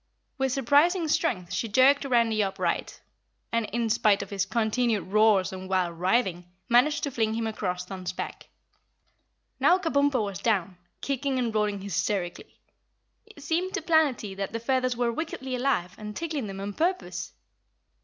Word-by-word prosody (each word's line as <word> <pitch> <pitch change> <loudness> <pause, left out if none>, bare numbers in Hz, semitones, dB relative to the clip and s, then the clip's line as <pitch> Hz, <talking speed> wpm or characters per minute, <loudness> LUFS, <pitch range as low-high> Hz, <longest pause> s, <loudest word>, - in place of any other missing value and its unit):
With 265 -1 +1
surprising 290 +7 +3
strength 190 - 0
she 230 - -1
jerked 265 +6 +4
Randy 230 -4 +2
upright 195 -2 -2 0.5
and, 230 -2 0
in 235 +1 -1
spite 210 -2 +3
of 200 - -12
his 200 -1 -1
continued 225 +1 +1
roars 205 -2 +3
and 185 0 -7
wild 180 -3 0
writhing, 180 -2 0 0.2
managed 250 +5 +3
to 285 - -1
fling 220 -3 0
him 230 0 -1
across 180 -5 -3
Thun's 185 -1 -5
back. - - -7 1.1
Now 360 - +5
Kabumpo 285 - +1
was 200 -2 -5
down, 190 -5 0 0.2
kicking 275 -1 -1
and 240 -3 -1
rolling 210 -2 0
hysterically. 190 -1 -3 0.7
It 430 -10 -14
seemed 345 +5 -1
to - - -3
Planetty 295 - +2
that 195 +1 -4
the 230 - -2
feathers 255 0 0
were 240 -1 +1
wickedly 265 -3 -4
alive 245 -9 0
and 210 -1 -7
tickling 310 -8 -3
them 195 0 -6
on 200 +1 -4
purpose. 360 - -2
230 Hz, 155 wpm, -27 LUFS, 195-275 Hz, 1.1 s, Now